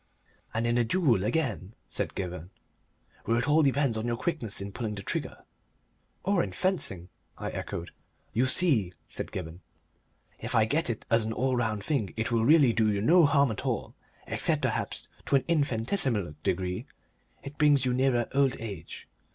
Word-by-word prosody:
"And 115 +1 -1
in 120 +1 +2
a - - +4
duel, 120 - +2
again," 110 - -1
said - - -3
Gibberne, 90 -2 -5 0.8
"where 115 - +2
it 125 - 0
all 150 +2 +5
depends 135 -5 +2
on 110 - -3
your 120 0 -1
quickness 135 - -2
in 100 +1 -5
pulling 105 0 -4
the 100 - -7
trigger." - - -4 0.8
"Or 195 -2 +2
in - - -3
fencing," 100 - +1 0.3
I - - -4
echoed. 85 - -5 0.4
"You 125 +3 +2
see," 130 - +2
said - - -5
Gibberne, 85 -2 -6 0.8
"if - - -4
I 110 - +5
get 145 +5 0
it 115 - -4
as 115 -1 +4
an 110 +1 -2
all 130 +3 0
round 110 -4 -1
thing 115 -7 -1
it 110 +2 -1
will 115 -1 +2
really 140 -2 +6
do 110 -2 +2
you 100 - 0
no 165 - +6
harm 140 -3 +3
at 110 - -5
all - - -2 0.3
except - - 0
perhaps - - -1 0.2
to - - +3
an 135 -1 +2
infinitesimal 125 - 0
degree 90 +1 -2 0.6
it 140 +1 -9
brings 145 -3 +4
you 125 - +1
nearer 125 -2 +2
old 135 -1 +2
age. 100 -8 -8
120 Hz, 175 wpm, -28 LUFS, 105-140 Hz, 0.8 s, really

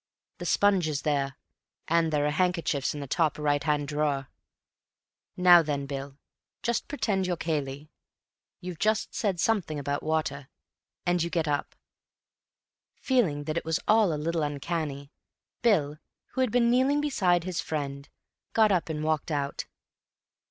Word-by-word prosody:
"The - - -4
sponge 195 -5 +3
is 145 -2 -2
there, 140 -2 0 0.5
and 165 -1 +2
there 145 -1 +1
are 150 - +1
handkerchiefs 165 -5 0
in 145 - -5
the - - -4
top 155 +2 +1
right 145 -1 +1
hand 150 -2 0
drawer. 145 -2 -1 1.1
Now 180 -1 +8
then, 145 -3 -2
Bill, 140 0 -6 0.5
just 235 -1 -1
pretend 200 -10 -1
you're 175 -1 -1
Cayley. 150 -2 -3 0.7
You've 180 -2 -6
just 215 0 +1
said 195 -6 -1
something 185 -7 +1
about 145 0 -2
water, 150 -3 -2 0.6
and 175 0 +2
you 170 - 0
get 165 -2 -1
up." 145 -1 -2 1.2
Feeling 190 - +1
that 155 +2 -3
it - - -1
was 160 0 0
all 215 -4 +5
a 155 - -1
little 165 +2 -1
uncanny, 145 -1 -3 0.5
Bill, 155 -11 +2 0.3
who 260 - -2
had 255 -4 +1
been 235 0 +3
kneeling 265 +4 +3
beside 185 - +2
his 185 0 -2
friend, 140 -2 -4 0.4
got 220 -2 +4
up 180 -3 +1
and 155 -1 -3
walked 155 0 0
out. 140 -2 -2
155 Hz, 150 wpm, -28 LUFS, 145-185 Hz, 1.2 s, Now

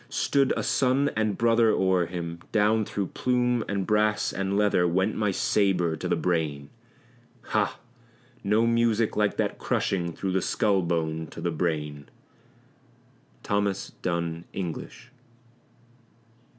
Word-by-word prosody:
stood 140 -2 +1
a - - -1
son 135 +2 +2
and 110 -2 0
brother 115 -1 +4
o'er 95 -4 +2
him; 85 -1 -5
Down 110 0 +3
through 100 -1 -2
plume 125 -2 +1
and 100 -2 -1
brass 105 0 +1
and 100 0 -1
leather 100 -4 +3
went 95 +5 +1
my 105 -1 +1
sabre 90 -4 +1
to - - -5
the - - +2
brain 75 -5 -1 0.7
Ha! - - 0 0.7
no 105 +3 +3
music 115 -1 +2
like 105 -1 +1
that - - -1
crushing 85 -3 -1
through 95 +2 -3
the 95 0 +1
skull 100 -1 +1
bone 80 -2 -2
to - - -11
the 85 - -1
brain. 75 -3 -3 1.3
THOMAS 100 -1 -1
DUNN 85 -1 -2
ENGLISH. 90 -4 -6
95 Hz, 130 wpm, -26 LUFS, 85-110 Hz, 1.3 s, brother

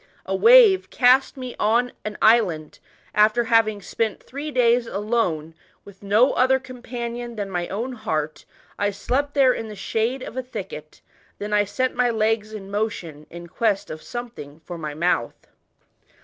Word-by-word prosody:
A - - -2
wave 455 -5 +6
cast 260 +2 +3
me 255 -2 -6
on 240 +3 +2
an 215 0 -5
island, 185 -10 +3 0.3
after 215 +3 +4
having 225 -3 +2
speiiu 220 +2 -2
three 285 +4 -7
days 245 -3 +2
alone 200 -8 -1 0.3
with 200 -1 -15
no 210 +6 +3
other 260 +1 +3
com 255 -1 -11
panion 240 0 -5
than 200 -2 -4
my 175 -1 -2
own 235 +6 -4
heart. 155 -10 -3 0.3
I 205 - +2
slept 270 +8 -2
there 265 -3 +5
in 225 - -5
the 215 - -8
shndp 230 +6 -2
of - - -9
a 260 - -1
thicket, 250 0 -9 0.4
then 210 +1 -5
I 205 0 +3
set 255 +6 -1
my 245 0 +2
legs 220 -1 0
in 200 -2 -8
motion 175 -8 -4
in 170 0 -9
quest 205 +2 -1
of 155 0 -7
something 230 -12 -8
for 175 - -7
my 155 -3 -6
mouth." 160 -7 -1
225 Hz, 165 wpm, -23 LUFS, 200-245 Hz, 0.4 s, wave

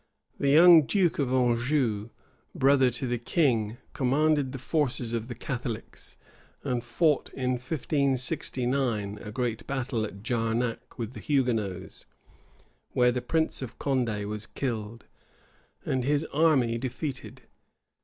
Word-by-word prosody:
The 140 - +2
young 160 0 +8
duke 185 -7 +2
of 135 -3 0
Anjou, 120 -3 +1 0.5
brother 135 -1 +4
to 120 +2 -4
the 120 -1 -1
king, 120 -5 +1 0.2
commanded 145 +1 +2
the 135 - -5
forces 130 -4 -1
of 115 -1 -2
the 120 - -6
Catholics; 120 -2 -6 0.5
and 120 -2 -1
fought 150 +5 +1
in 130 -1 -1
1569, 125 -5 -1
a 105 - -7
great 115 -1 -3
battle 130 -4 -2
at 100 -2 -7
Jarnac 115 0 -2
with 115 0 -4
the - - -8
Hugonots, 120 -10 -1 0.9
where 125 -1 +4
the 125 0 -2
prince 160 +5 0
of 130 -4 -7
Condé 120 -7 -1
was 105 +1 -5
killed, 115 -3 -4 0.8
and 130 -1 0
his 145 +3 +1
army 135 -7 +3
defeated. 130 +2 -5
125 Hz, 125 wpm, -28 LUFS, 115-140 Hz, 0.9 s, young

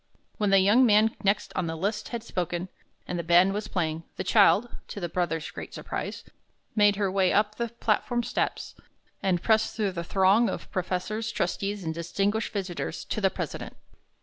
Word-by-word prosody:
When 210 -1 +2
the 195 - +6
young 205 +7 +5
man 220 -1 +4
next 200 +1 +1
on 180 - -1
the 160 - -3
list 200 +6 -2
had 235 -2 -5
spoken, 180 -3 -3 0.4
and 180 - -3
the - - -2
band 175 +3 +5
was 210 +1 -3
playing, 160 -5 -1
the - - -3
child, 220 +2 +4
to - - -6
the 175 - -2
brother's 165 -2 -2
great - - -8
surprise, - - -5 0.5
made 205 -1 +5
her 200 -2 0
way 190 -1 +2
up 210 0 +2
the 235 - -1
platform 235 +1 0
steps, - - -2 0.5
and 185 -3 0
pressed 220 -1 +2
through 210 -3 0
the 170 -2 -4
throng 195 +6 +3
of - - -6
professors, 190 +5 -2
trustees, 200 +1 -2
and 160 -1 -2
distinguished 195 +6 -1
visitors, 190 -4 -4
to 215 - -3
the 195 - +4
president. - - -6
195 Hz, 180 wpm, -27 LUFS, 180-215 Hz, 0.5 s, the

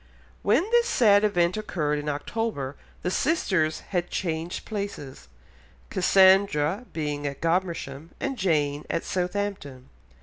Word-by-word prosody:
When - - +3
this 475 0 +4
sad 210 - +4
event 175 -3 +2
occurred 150 -8 -1
in 150 0 -3
October 145 - -3 0.3
the 180 - 0
sisters 185 - +1
had 175 -3 0
again - - -26
changed 165 -1 -3
places, 200 - -6 0.6
Cassandra 190 0 +4
being 145 -2 -3
at 140 -1 -5
Godmersham 165 -4 -2
and 275 -1 -2
Jane 150 - 0
at 170 - -1
Southampton. 180 -8 -3
175 Hz, 125 wpm, -26 LUFS, 150-200 Hz, 0.6 s, this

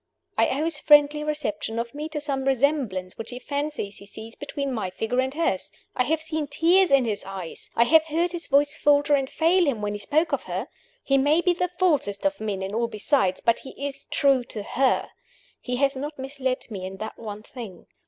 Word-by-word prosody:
I - - +4
owe - - 0
his 325 -2 0
friendly 295 0 +5
reception 230 -8 -3
of 235 0 -3
me 300 +2 -5
to 305 -1 -3
some 275 -2 -1
resemblance 260 -9 0
which 225 0 -6
he 245 - -6
fancies 285 -6 -3
he 200 - -11
sees 220 +2 -9
between 280 -2 -4
my 215 -6 -2
figure 225 +7 -2
and 260 0 -1
hers. 290 - -1 0.2
I 250 - +2
have 315 +2 0
seen 315 -2 -2
tears 340 +6 +4
in 275 -2 +5
his 210 -3 -1
eyes, 190 -4 -7
I 235 - +5
have 315 +6 +5
heard 330 +3 0
his 345 -1 -3
voice 285 +1 +3
falter 290 0 +3
and 270 -2 +2
fail 345 +5 +3
him, 255 -6 0
when 205 0 -2
he 205 - -5
spoke 315 +9 +1
of - - -1
her. - - -4 0.3
He 275 0 +3
may 290 +4 +4
be 355 0 +3
the 360 +1 -1
falsest 290 - +1
of 290 -3 0
men 200 -3 -2
in 195 +1 -4
all 235 +1 +1
besides, 215 -3 +1
but 230 - +2
he 265 - -11
is 280 -1 -6
true 275 -3 +3
to 215 -3 -5
her 265 +5 +1 0.5
he 250 - -3
has 275 +2 +2
not 295 +3 -5
misled 265 -2 -3
me 195 -3 -5
in 190 +1 -6
that 220 +2 -7
one 210 -2 -7
thing. 220 -8 -10
275 Hz, 220 wpm, -25 LUFS, 220-300 Hz, 0.5 s, friendly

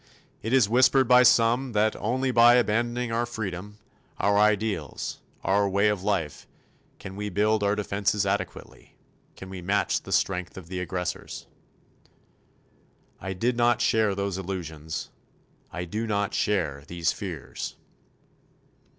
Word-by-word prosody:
It 110 - -4
is 130 -5 +5
whispered 130 +3 +4
by 125 0 +7
some 120 +1 +4
that, 105 +1 +2
only 130 +5 -1
by 120 0 +7
abandoning 120 +1 +1
our 120 +1 0
freedom, 105 -3 -6 0.4
our 100 0 +2
ideals, 105 - 0 0.2
our 100 +1 +2
way 100 +2 +3
of 105 -3 -1
life, 95 -7 -2 0.5
can 95 - -9
we 105 +1 -4
build 105 +3 +1
our 100 0 +2
defenses 100 -1 0
adequately, - - -4 0.4
can 95 - -10
we 95 -1 -7
match 100 +3 0
the - - -10
strength 90 -2 0
of 90 -3 -10
the 90 -1 -4
aggressors. 90 -1 -4 1.7
I 95 0 -4
did 120 +7 0
not 120 -1 +3
share 110 -3 +2
those 100 -1 -2
illusions. 80 -5 -5 0.6
I 90 - -4
do 110 +6 -3
not 100 -2 -1
share 75 -9 0
these 85 -2 -1
fears. - - -6
105 Hz, 135 wpm, -26 LUFS, 95-115 Hz, 1.7 s, by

